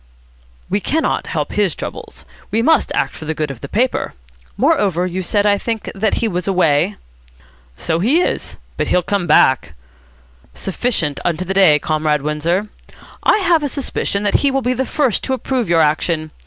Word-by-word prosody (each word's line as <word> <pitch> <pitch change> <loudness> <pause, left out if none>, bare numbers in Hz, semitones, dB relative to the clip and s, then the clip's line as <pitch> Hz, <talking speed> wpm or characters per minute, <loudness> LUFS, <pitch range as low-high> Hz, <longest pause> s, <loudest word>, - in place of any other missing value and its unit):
"We 200 - 0
cannot 315 +10 -1
help - - -2
his - - +1
troubles. - - -8 0.2
We 225 +1 0
must 320 +5 +3
act - - 0
for 160 - -9
the 160 +1 -3
good 150 -2 -2
of 125 - -10
the 140 - -7
paper. 250 +4 0 0.4
Moreover, 180 -4 +2
you 185 +1 -3
said, 205 +3 0
I 205 -1 +3
think, 225 -2 -3
that 210 +2 0
he 230 - 0
was 180 -3 -3
away?" 180 0 +2 0.8
"So 165 0 -1
he 255 - +3
is. - - -2 0.2
But - - -1
he'll 180 - +2
come 195 -1 -1
back." 125 - +3 0.8
"Sufficient 185 - -1
unto 175 +1 -1
the 190 - -2
day, 190 -6 +6
Comrade 150 -1 0
Windsor. 165 +7 -1 0.5
I - - +4
have 340 -2 +4
a 290 - -1
suspicion 255 -7 -2
that 205 - +2
he 280 - +3
will 270 -1 -1
be 250 +1 +1
the 260 0 -2
first 275 -8 0
to 265 - -1
approve 255 -5 -2
your 165 -1 +4
action. 155 +1 0
190 Hz, 180 wpm, -18 LUFS, 155-230 Hz, 0.8 s, day